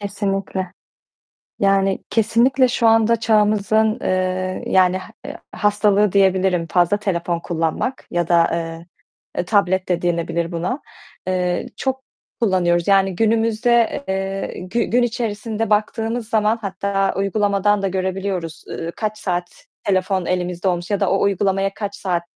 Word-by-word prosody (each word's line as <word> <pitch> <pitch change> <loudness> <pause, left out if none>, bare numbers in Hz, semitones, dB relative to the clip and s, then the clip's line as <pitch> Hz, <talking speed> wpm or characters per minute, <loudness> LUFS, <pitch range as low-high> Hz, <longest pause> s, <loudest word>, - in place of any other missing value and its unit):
Kesinlikle. 195 -2 -3 0.9
Yani, 195 -1 +2
kesinlikle 245 +4 +3
şu 235 -1 +1
anda 225 +1 +4
çağımızın, 215 0 +2
eee, 185 0 -1
yani 185 -1 +4 0.3
e - - -5
h - - -10
hastalığı 205 -1 +2
diyebilirim 190 -3 +2
fazla 175 +3 +3
telefon 175 -4 -2
kullanmak 170 +10 -2
yada, 170 -1 +3 0.9
eee, - - -1
tablet 190 -2 +1
de 175 -1 0
denilebilir 170 0 -1
buna, 180 - -2 0.5
eee, 180 +2 -1
çok 265 0 -2 0.4
kullanıyoruz, 175 -5 +2
yani 195 -1 +3
günümüzde, 230 +4 +2
eee, 195 0 -3
gü 190 +6 -1
gün 245 +1 +2
içerisinde 225 -2 -2
baktığımız 225 +2 0
zaman, 220 0 +2
hatta 195 0 -1
uygulamadan 200 0 +1
da 195 - +1
görebiliyoruz, 185 -3 -3
ııı, 165 +1 -5
kaç 215 -1 -3
saat 175 -2 -4 0.2
telefon 190 -1 0
elimizde 180 +1 -1
olmuş 175 0 -2
ya 205 - 0
da - - +1
o 195 - +2
uygulamaya 195 0 +1
kaç 200 -2 -5
saat 180 -3 -1
195 Hz, 130 wpm, -20 LUFS, 185-215 Hz, 0.9 s, anda